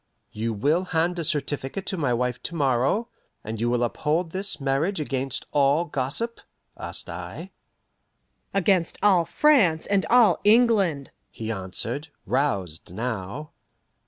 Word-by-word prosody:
"You 115 +2 -2
will 145 - +1
hand 175 0 0
a - - -1
certificate 145 +3 -2
to - - -2
my 145 -8 0
wife 125 +1 -1
to 170 - -5
morrow, 140 - +1 0.3
and 110 +1 -5
you 120 - +1
will 120 0 +1
uphold 160 +7 -1
this 190 -4 -2
marriage 140 +7 0
against 135 -2 -3
all 145 +3 +3
gossip?" 150 - -3 0.3
asked - - -6
I. - - -7 1.0
"Against 190 -3 +2
all 185 -5 +5
France 190 - +3
and 200 -1 +2
all 230 -7 +5
England," 205 - +3 0.2
he 110 0 -5
answered, 110 - -3 0.2
roused 95 - -1
now. 115 +5 -4
150 Hz, 130 wpm, -25 LUFS, 125-185 Hz, 1.0 s, all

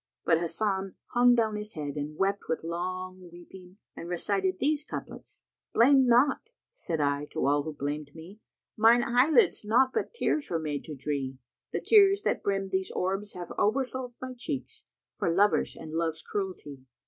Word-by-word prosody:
But 165 -1 +4
Hasan 190 +2 -2 0.2
hung 245 0 +5
down 220 -3 +1
his 210 +1 -6
head 145 -2 -5
and 150 +1 -5
wept 195 +1 0
with 160 - -1
long 185 +2 -5
weeping 180 +2 -14 0.2
and 170 - -8
recited 190 +1 0
these 295 +4 +1
couplets, - - -9 0.3
"'Blame 265 +2 +6
not!' 255 - +3 0.2
said 170 - -4
I 145 0 0
to - - -3
all 145 +1 +3
who 155 +2 -5
blamčd 145 +1 -4
me; 175 +6 -12 0.2
* - - -65
'Mine 230 +2 +6
eye 245 +5 +3
lids 355 - +4
naught 245 +5 +3
but - - -2
tears 310 -10 -1
were 170 - 0
made 150 -3 -3
to 155 - -7
dree:' 135 -1 -3 0.3
The - - -2
tears 400 -1 +5
that - - 0
brim 195 -1 -1
these 190 0 -1
orbs 195 +3 -2
have 175 -1 -7
overflowed 255 +2 -1
* - - -44
My 255 0 -5
checks, 260 +3 -6 0.3
for - - +1
lovers 200 +4 +2
and 160 -1 -9
love's 160 -1 -2
cruelty. 180 -9 -5
190 Hz, 180 wpm, -28 LUFS, 160-240 Hz, 0.3 s, Blame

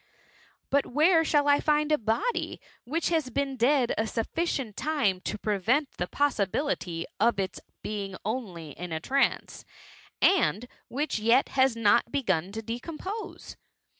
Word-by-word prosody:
'' - - -32
But 280 0 +2
where 325 +5 +4
shall 295 -2 +2
I 285 0 +5
£nd 300 0 +1
a 305 - +5
body, 240 - -1 0.3
which 320 +7 -1
has 320 -6 0
been 275 +1 -1
dead 255 0 +3
a 220 - +1
sufficieot 240 +1 -2
time 255 -12 0
to - - -3
prevent 220 +8 0
the 180 - -1
pojfr 280 -7 +1
aibility 180 - -2 0.2
of 230 0 +3
its 190 -1 -2 0.2
being 200 -2 -4
only 195 - -4
in 175 +4 -7
a 160 - -2
trance, 270 +11 0 0.6
and 250 - +3 0.2
which 280 -2 -2
yet 230 +5 +3
has 260 -2 +3
not 230 +1 +3
begun 190 - 0
to 225 +1 -5
decompose 330 - -6
245 Hz, 150 wpm, -28 LUFS, 210-295 Hz, 0.6 s, I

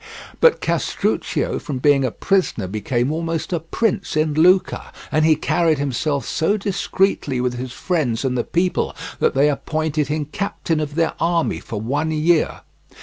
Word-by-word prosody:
But 485 - +5
Castruccio - - -1
from 140 -4 -5
being 140 +1 +3
a 130 - +1
prisoner 185 - 0
became 120 +7 -1
almost 165 +2 -2
a 170 - +1
prince 190 +2 -1
in 155 0 +1
Lucca, 180 +5 +3 0.2
and 155 - +2
he 160 0 +5
carried 165 0 +1
himself 140 -1 -1
so 200 +7 +1
discreetly 195 - 0
with 125 0 0
his 125 +1 -5
friends 140 -6 -1
and 130 -1 0
the 120 - 0
people 180 +1 0 0.2
that - - +2
they 140 +2 +4
appointed 155 0 -1
him 150 0 -1
captain 170 -5 -2
of 150 -1 -4
their 165 -1 +1
army 170 0 +1
for 110 - -6
one 145 +8 -1
year. 160 +1 +1
155 Hz, 160 wpm, -21 LUFS, 135-170 Hz, 0.2 s, But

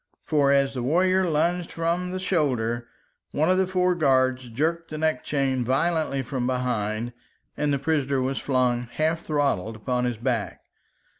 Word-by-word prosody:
For 145 -3 +2
as 140 -1 +3
the 125 - -3
warrior 185 +7 +2
lunged 170 +3 0
from 170 +2 -1
the 185 +1 -3
shoulder, 125 -10 0 0.5
one 155 +4 +2
of 185 - +3
the 190 - +2
four 180 -1 +2
guards 130 -5 +2
jerked 165 +7 -1
the 155 - -5
neck 155 -4 0
chain 135 -3 0
violently 140 +2 0
from 125 -1 -2
behind, 120 -2 -1 0.4
and 150 -1 0
the 140 - +2
prisoner 140 -2 0
was 130 +1 -1
flung, 125 -2 +1
half 160 +5 +1
throttled, 140 - -1
upon 125 +3 -1
his 120 -2 -2
back. 115 -2 -2
140 Hz, 160 wpm, -25 LUFS, 125-165 Hz, 0.5 s, as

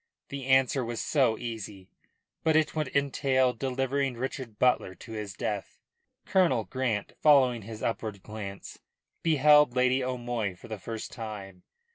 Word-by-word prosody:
The 140 -2 -6
answer 130 0 +3
was 115 -1 -4
so 130 -7 +2
easy, 105 -5 -6 0.6
but 160 -1 +3
it 155 0 +2
would 155 -2 0
entail 135 -2 +2
delivering 135 +1 -1
Richard 125 -2 -5
Butler 125 -6 +2
to 115 - -12
his 105 -3 -5
death. 105 -2 -4 0.5
Colonel 170 -12 +3
Grant, 120 -6 -2
following 130 -6 +5
his 110 +1 -8
upward 110 -4 -3
glance, 100 -2 -8 0.4
beheld 150 -4 +5
Lady 130 +1 +3
O'Moy 120 -6 -2
for - - -13
the 110 -2 -5
first 115 +2 -6
time. 100 -5 -7
125 Hz, 140 wpm, -28 LUFS, 110-135 Hz, 0.6 s, following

